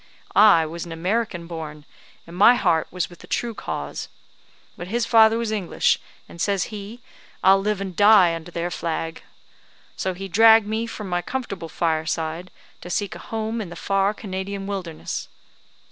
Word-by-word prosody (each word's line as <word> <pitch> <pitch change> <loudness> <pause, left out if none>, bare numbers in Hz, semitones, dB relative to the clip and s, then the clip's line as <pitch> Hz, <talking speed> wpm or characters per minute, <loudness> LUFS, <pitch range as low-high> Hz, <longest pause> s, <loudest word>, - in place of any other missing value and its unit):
I 200 -6 +7
was 165 +2 -6
an 170 - -9
American 180 +1 -2
born, 155 -3 -7 0.4
and 170 - -11
my 210 +6 +7
heart 175 -9 +1
was 180 -1 -2
with 175 - -16
the - - -14
true 235 -1 -2
cause. 70 - -5 0.7
But 175 - -7
his 230 +4 0
father 225 -1 +5
was 230 -2 -2
English, 205 -5 +1 0.3
and, 170 - -9
says 200 -2 +1
he, 210 +4 -8 0.4
'I'll 195 +1 +6
live 210 0 -1
and 190 -2 -5
die 205 -4 +6
under 165 +1 -6
their 175 0 -3
flag.' 165 -1 -3 0.7
So 185 -1 -2
he 195 +2 -6
dragged 220 +3 +6
me 220 +2 -2
from 210 -3 -7
my 175 -1 -1
comfortable 195 -9 -5
fireside 160 +1 -2 0.3
to 175 - -9
seek 200 +2 -1
a - - -9
home 225 +1 -3
in 195 - -6
the 175 - -9
far 195 +3 0
Canadian 195 -1 -5
wilderness. 185 -5 -5
190 Hz, 170 wpm, -23 LUFS, 170-215 Hz, 0.7 s, I